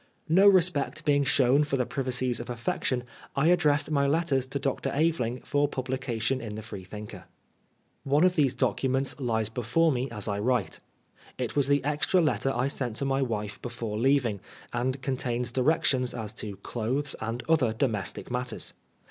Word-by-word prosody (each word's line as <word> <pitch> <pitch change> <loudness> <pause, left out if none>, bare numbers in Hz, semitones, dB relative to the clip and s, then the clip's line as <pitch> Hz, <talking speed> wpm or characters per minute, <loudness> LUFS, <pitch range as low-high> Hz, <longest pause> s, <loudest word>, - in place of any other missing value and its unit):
No 190 +5 +6
respect 180 -7 +3
being 145 -1 +3
shown 135 +1 +4
for 140 -2 -1
the 125 - +1
privacies 130 -2 -1
of 120 - -7
affection, 125 +1 -1 0.3
I 155 +4 +3
addressed 150 -4 +3
my 140 -2 +2
letters 140 -4 +1
to 135 - -3
Dr. 135 -1 -1
Aveling 140 -6 0
for 145 0 +1
publication 130 -2 -2
in 110 -2 -6
the 110 - -6
Freethinker. 105 0 -8 0.8
One 145 +4 +3
of 180 0 +4
these 135 -5 +2
documents 130 +3 0
lies 110 -4 0
before 125 +9 +1
me 130 0 -1
as 105 -2 -3
I 100 -1 -1
write. 120 -2 0 0.6
It 125 -3 -3
was 140 -2 +3
the 140 0 +2
extra 150 +6 +2
letter 150 -4 +1
I 130 0 0
sent 125 -5 -2
to 140 - -2
my 135 0 +1
wife 105 -5 -3
before 115 -3 -4
leaving, 130 -5 +2 0.3
and 130 +2 -1
contains 125 -2 -1
directions 130 -1 +1
as 110 -2 -5
to 105 -2 -6
clothes 130 +5 -2
and 115 +2 -3
other 155 -8 +3
domes 110 -4 0
tic - - -9
matters. 125 0 -3
130 Hz, 170 wpm, -28 LUFS, 120-145 Hz, 0.8 s, No